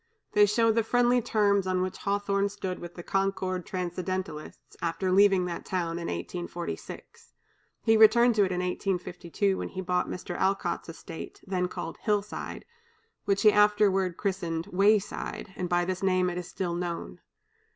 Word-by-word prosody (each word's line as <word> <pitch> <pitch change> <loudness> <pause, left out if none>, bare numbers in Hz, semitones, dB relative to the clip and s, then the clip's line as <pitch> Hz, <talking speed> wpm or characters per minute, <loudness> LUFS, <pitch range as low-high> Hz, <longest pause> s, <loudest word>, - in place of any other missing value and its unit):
They 210 0 +5
show 230 +2 +3
the 230 +1 +2
friendly 245 +2 +3
terms 200 -3 +2
on 185 0 +1
which 185 0 -4
Hawthorne 200 0 0
stood 185 -2 -5
with 175 0 -9
the 175 - -8
Concord 190 -2 -1
Transcendentalists, 180 -3 -5
after 170 +3 -1
leaving 195 -1 +5
that 175 -1 -4
town 170 -2 -2
in 170 - -4
1846. 175 - -6 0.5
He 225 -1 +4
returned 235 +2 +6
to 215 - +2
it 185 - 0
in 180 0 -1
1852, 180 +1 -1
when - - -3
he 190 - -5
bought 180 -1 0
Mr. 180 -1 -5
Alcott's 190 -3 -1
estate, 165 0 -9
then 185 -2 -1
called 165 -2 -6
"Hillside," 210 -1 -2 0.6
which 200 -1 +1
he 215 - +8
afterward 205 -4 +3
christened 170 -5 -2
"Wayside," 200 0 +1
and 180 -1 -3
by 175 0 +2
this 185 0 -3
name 185 -1 +2
it 175 - -5
is 175 - -7
still 180 -3 -3
known. 170 - -4
185 Hz, 160 wpm, -28 LUFS, 180-205 Hz, 0.6 s, he